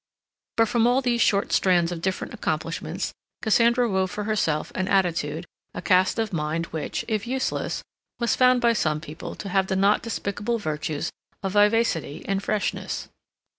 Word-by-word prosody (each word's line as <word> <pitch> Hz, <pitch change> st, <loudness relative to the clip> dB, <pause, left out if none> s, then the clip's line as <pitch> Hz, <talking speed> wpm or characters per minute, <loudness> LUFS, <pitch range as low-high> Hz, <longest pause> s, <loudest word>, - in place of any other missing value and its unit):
But 225 Hz, 0 st, +5 dB
from 235 Hz, +1 st, +3 dB
all 250 Hz, +2 st, +3 dB
these 240 Hz, -1 st, +1 dB
short 200 Hz, -1 st, +2 dB
strands 175 Hz, -2 st, +3 dB
of 170 Hz, -2 st, -4 dB
different 190 Hz, +1 st, -2 dB
accomplishments -, -, -3 dB, 0.3 s
Cassandra 235 Hz, +2 st, +4 dB
wove 190 Hz, -3 st, +1 dB
for 210 Hz, -, -4 dB
herself 195 Hz, -8 st, 0 dB
an 185 Hz, 0 st, -1 dB
attitude, 170 Hz, -4 st, +1 dB, 0.3 s
a -, -, -4 dB
cast 185 Hz, 0 st, +3 dB
of 225 Hz, -3 st, -1 dB
mind, 160 Hz, +1 st, -1 dB
which, 155 Hz, -2 st, -3 dB
if 220 Hz, 0 st, -1 dB
useless, 260 Hz, +1 st, -2 dB, 0.4 s
was 235 Hz, -2 st, +2 dB
found 250 Hz, -1 st, +5 dB
by 235 Hz, -1 st, +4 dB
some 155 Hz, -8 st, 0 dB
people 155 Hz, +1 st, -8 dB
to 200 Hz, -, -6 dB
have 190 Hz, 0 st, +2 dB
the 190 Hz, -, 0 dB
not 200 Hz, +2 st, +3 dB
despicable 225 Hz, 0 st, -2 dB
virtues 155 Hz, -5 st, -3 dB, 0.3 s
of 195 Hz, -, -1 dB
vivacity 205 Hz, -7 st, +2 dB
and 195 Hz, 0 st, 0 dB
freshness. 210 Hz, 0 st, -2 dB
195 Hz, 165 wpm, -25 LUFS, 170-230 Hz, 0.4 s, But